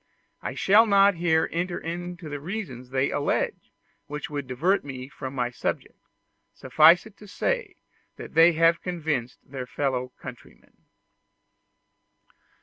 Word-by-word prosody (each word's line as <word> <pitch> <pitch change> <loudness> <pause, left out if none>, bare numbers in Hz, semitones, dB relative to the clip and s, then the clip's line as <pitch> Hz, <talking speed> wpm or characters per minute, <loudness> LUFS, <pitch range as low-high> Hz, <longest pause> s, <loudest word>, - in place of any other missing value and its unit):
I - - -5
shall 215 +4 +5
not 200 -1 +5
here 165 -2 +1
enter 175 +1 -2
into 175 0 -6
the 145 -1 -5
reasons 145 - -6
they 135 +1 0
allege, 145 - -1 0.4
which 150 +1 -6
would 145 -2 -4
divert 165 +11 +1
me 130 -2 -7
from 135 -1 -7
my 125 -2 -1
subject: - - -4 0.6
suffice 155 +6 +5
it 220 -2 -14
to 210 - -14
say 480 - -2 0.4
that - - -10
they 165 +2 +6
have 165 +1 +3
convinced 155 -9 -3
their 130 -2 -7
fellow 125 -2 -2
countrymen. - - -12
160 Hz, 135 wpm, -26 LUFS, 135-180 Hz, 0.6 s, they